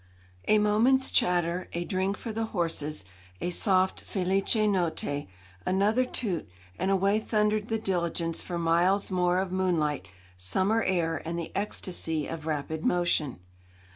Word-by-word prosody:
A 215 Hz, -, +5 dB
moment's 225 Hz, +6 st, +3 dB
chatter, 175 Hz, 0 st, +1 dB
a 175 Hz, 0 st, -2 dB
drink 190 Hz, +1 st, -1 dB
for 225 Hz, -, -6 dB
the 225 Hz, +1 st, -1 dB
horses, 165 Hz, -, -2 dB, 0.3 s
a 175 Hz, -, -2 dB
soft 185 Hz, 0 st, +3 dB
'Felice 195 Hz, +2 st, +1 dB
notte,' 165 Hz, -, -1 dB, 0.4 s
another 210 Hz, +7 st, +2 dB
toot, 200 Hz, -, -3 dB, 0.3 s
and 185 Hz, -, 0 dB
away 195 Hz, +2 st, +2 dB
thundered 210 Hz, -1 st, 0 dB
the 225 Hz, -, 0 dB
diligence 170 Hz, -5 st, -1 dB
for 175 Hz, -, -5 dB
miles 175 Hz, +4 st, +2 dB
more 180 Hz, -1 st, +2 dB
of 190 Hz, -1 st, -1 dB
moonlight, 165 Hz, -, 0 dB, 0.3 s
summer 190 Hz, -, +2 dB
air, 165 Hz, -6 st, 0 dB
and 165 Hz, +1 st, -4 dB
the 170 Hz, -, -5 dB
ecstasy 175 Hz, -6 st, 0 dB
of 160 Hz, 0 st, -6 dB
rapid 155 Hz, +1 st, -3 dB
motion. 160 Hz, -, +1 dB
180 Hz, 140 wpm, -28 LUFS, 165-200 Hz, 0.4 s, A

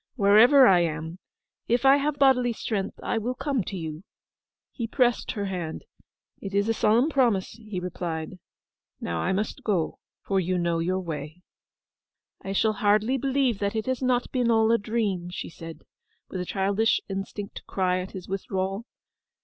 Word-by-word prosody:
'Wherever 240 Hz, +5 st, +7 dB
I 185 Hz, -5 st, +6 dB
am, 160 Hz, +1 st, -3 dB, 0.5 s
if 240 Hz, +2 st, +1 dB
I 270 Hz, +1 st, +7 dB
have 285 Hz, +1 st, -1 dB
bodily 255 Hz, -3 st, +4 dB
strength 210 Hz, -3 st, -3 dB
I 225 Hz, -, 0 dB
will 245 Hz, +3 st, -3 dB
come 270 Hz, -4 st, -1 dB
to 195 Hz, -, -5 dB
you.' 160 Hz, 0 st, -6 dB, 0.7 s
He 230 Hz, -3 st, -4 dB
pressed 245 Hz, 0 st, +1 dB
her 205 Hz, -2 st, -3 dB
hand. 175 Hz, -5 st, -5 dB, 0.6 s
'It 195 Hz, 0 st, -5 dB
is 200 Hz, +1 st, +2 dB
a 225 Hz, -, +2 dB
solemn 225 Hz, +5 st, +3 dB
promise,' 245 Hz, -11 st, +1 dB
he 215 Hz, -4 st, -7 dB
replied. 175 Hz, -1 st, -5 dB, 0.6 s
'Now 85 Hz, -1 st, -3 dB
I 185 Hz, -, 0 dB
must 200 Hz, +3 st, -2 dB
go, 185 Hz, -7 st, -1 dB, 0.2 s
for 195 Hz, -1 st, +1 dB
you 185 Hz, 0 st, 0 dB
know 170 Hz, -1 st, 0 dB
your 185 Hz, +3 st, 0 dB
way.' 160 Hz, -1 st, -6 dB, 1.0 s
'I 195 Hz, -, -4 dB
shall 215 Hz, +2 st, +2 dB
hardly 215 Hz, +4 st, +2 dB
believe 265 Hz, -4 st, +1 dB
that 200 Hz, +1 st, -1 dB
it 220 Hz, -, -1 dB
has 260 Hz, 0 st, -2 dB
not 250 Hz, -1 st, +1 dB
been 250 Hz, -3 st, +1 dB
all 225 Hz, -1 st, +4 dB
a 230 Hz, -, +4 dB
dream!' 205 Hz, -5 st, -2 dB
she 180 Hz, -, -6 dB
said, 165 Hz, 0 st, -10 dB, 0.5 s
with 185 Hz, -, -4 dB
a -, -, -4 dB
childish 200 Hz, +4 st, +1 dB
instinct 195 Hz, +1 st, -5 dB
to -, -, -9 dB
cry 185 Hz, -1 st, 0 dB
at 185 Hz, +1 st, -6 dB
his 185 Hz, -2 st, -8 dB
withdrawal. 195 Hz, +2 st, -3 dB
200 Hz, 175 wpm, -26 LUFS, 185-235 Hz, 1.0 s, Wherever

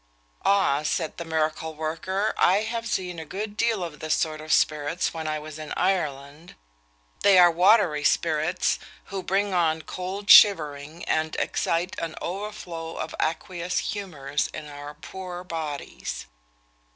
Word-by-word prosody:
'Ah,' 195 Hz, -8 st, +3 dB
said 155 Hz, +1 st, -2 dB
the 170 Hz, -, -4 dB
miracle 160 Hz, 0 st, -1 dB
worker, 165 Hz, +6 st, -2 dB
'I 190 Hz, +3 st, +5 dB
have 230 Hz, +1 st, -3 dB
seen 180 Hz, -5 st, -2 dB
a -, -, -5 dB
good 205 Hz, +6 st, -5 dB
deal 225 Hz, -4 st, +1 dB
of 160 Hz, -3 st, -7 dB
this 155 Hz, 0 st, 0 dB
sort 155 Hz, -1 st, -1 dB
of 155 Hz, 0 st, -6 dB
spirits 155 Hz, +3 st, +1 dB
when 160 Hz, -1 st, -4 dB
I 155 Hz, 0 st, -1 dB
was 155 Hz, 0 st, -8 dB
in 155 Hz, -, -7 dB
Ireland. 155 Hz, -4 st, -2 dB, 0.7 s
They 200 Hz, -2 st, +6 dB
are 175 Hz, -1 st, +8 dB
watery 175 Hz, -3 st, +4 dB
spirits, 160 Hz, +3 st, +1 dB, 0.3 s
who 195 Hz, -, -2 dB
bring 195 Hz, +1 st, 0 dB
on 160 Hz, -3 st, +1 dB
cold 190 Hz, +3 st, -5 dB
shivering, 155 Hz, -5 st, +6 dB
and 155 Hz, 0 st, 0 dB
excite 170 Hz, +2 st, 0 dB
an 165 Hz, -1 st, -4 dB
overflow 175 Hz, -4 st, -5 dB
of 155 Hz, -, -4 dB
aqueous 175 Hz, +2 st, -2 dB, 0.2 s
humours 155 Hz, -9 st, -3 dB
in 155 Hz, -1 st, -8 dB
our 145 Hz, 0 st, -9 dB
poor 180 Hz, +4 st, -8 dB
bodies.' 160 Hz, -5 st, -5 dB
165 Hz, 145 wpm, -25 LUFS, 155-190 Hz, 0.7 s, are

